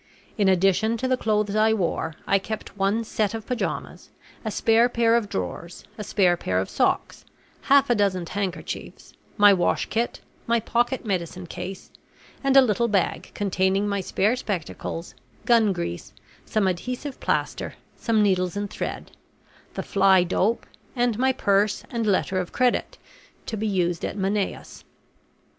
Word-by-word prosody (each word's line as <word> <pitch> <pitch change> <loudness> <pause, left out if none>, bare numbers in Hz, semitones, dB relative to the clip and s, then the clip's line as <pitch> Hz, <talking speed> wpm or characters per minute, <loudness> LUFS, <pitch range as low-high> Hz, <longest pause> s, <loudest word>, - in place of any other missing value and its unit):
In 205 -4 +3
addition 195 +4 +3
to 260 - -2
the 255 - +3
clothes 210 -3 0
I 220 +1 +4
wore, 170 -5 -1
I 195 - +3
kept 215 +1 -6
one 200 +3 +1
set 215 -1 -1
of 220 -1 -6
pajamas, 250 -1 -4 0.3
a 220 - -2
spare 225 +3 +3
pair 230 -1 +3
of 225 -3 0
drawers, 95 - -5
a 210 - -6
spare 185 -3 +3
pair 95 - -2
of 95 - -3
socks, - - 0 0.4
half 280 0 +4
a 240 - +3
dozen 195 -5 +1
handkerchiefs, 190 0 -5 0.2
my 205 -1 +7
wash 180 -2 +1
kit, 235 +2 -1 0.3
my 235 0 +3
pocket 240 +3 0
medicine 185 -2 -3
case, 190 +3 -7 0.5
and 275 0 +4
a 270 - +9
little 235 0 +1
bag 200 -5 0
containing 195 0 +1
my 200 -1 -1
spare 205 +5 +1
spectacles, 175 -6 -5 0.3
gun 230 -4 +4
grease, 170 - -5 0.3
some 215 -3 +1
adhesive 250 +10 -4
plaster, - - -2 0.2
some 220 -2 +1
needles 185 -1 +1
and 205 -1 -3
thread, - - -5 0.6
the - - -3
"fly 190 -2 +4
dope," 190 +5 0 0.3
and 240 -3 +1
my 265 +1 +3
purse 205 -3 +1
and 230 -2 -1
letter 190 -1 +1
of 180 - -4
credit, 250 -1 0 0.5
to 225 - -4
be 220 +1 -2
used 175 -4 0
at - - -3
Manaos. 195 0 -2
205 Hz, 155 wpm, -24 LUFS, 190-230 Hz, 0.6 s, a